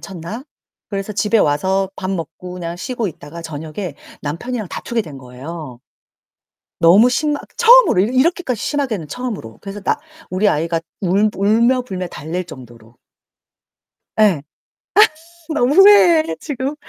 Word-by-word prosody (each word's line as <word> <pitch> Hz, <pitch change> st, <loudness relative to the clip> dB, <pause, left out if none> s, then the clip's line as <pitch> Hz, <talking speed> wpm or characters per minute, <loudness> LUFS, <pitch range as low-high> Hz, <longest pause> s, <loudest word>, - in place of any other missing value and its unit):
쳤나? 195 Hz, +7 st, -7 dB, 0.4 s
그래서 200 Hz, +1 st, -4 dB
집에 210 Hz, +2 st, +2 dB
와서 190 Hz, +5 st, +1 dB
밥 185 Hz, 0 st, -4 dB
먹고 180 Hz, 0 st, -6 dB
그냥 170 Hz, -1 st, -5 dB
쉬고 235 Hz, +4 st, -3 dB
있다가 165 Hz, +1 st, -10 dB
저녁에 160 Hz, +2 st, -6 dB, 0.3 s
남편이랑 210 Hz, +9 st, -4 dB
다투게 235 Hz, +5 st, -3 dB
된 150 Hz, -7 st, -10 dB
거예요. 130 Hz, +2 st, -9 dB, 1.0 s
너무 185 Hz, +8 st, +7 dB
심하 295 Hz, +3 st, 0 dB, 0.2 s
처음으로 485 Hz, -, +6 dB
이 235 Hz, +6 st, -1 dB
이렇게까지 265 Hz, -, +1 dB
심하게는 245 Hz, -, -2 dB
처음으로. 215 Hz, -, -6 dB
그래서 200 Hz, +1 st, -7 dB
나 -, -, 0 dB, 0.3 s
우리 190 Hz, +3 st, +2 dB
아이가 165 Hz, +1 st, 0 dB, 0.2 s
울 200 Hz, +3 st, +2 dB
울며 230 Hz, +6 st, +3 dB
불며 185 Hz, -6 st, -5 dB
달랠 170 Hz, +4 st, -5 dB
정도로. 120 Hz, -6 st, -13 dB, 1.2 s
예. 195 Hz, -9 st, +4 dB, 1.1 s
아 -, -, -1 dB
너무 275 Hz, -1 st, +2 dB
후회해 355 Hz, -4 st, +6 dB
지금. 275 Hz, -1 st, -3 dB
195 Hz, 295 characters per minute, -18 LUFS, 165-245 Hz, 1.2 s, 너무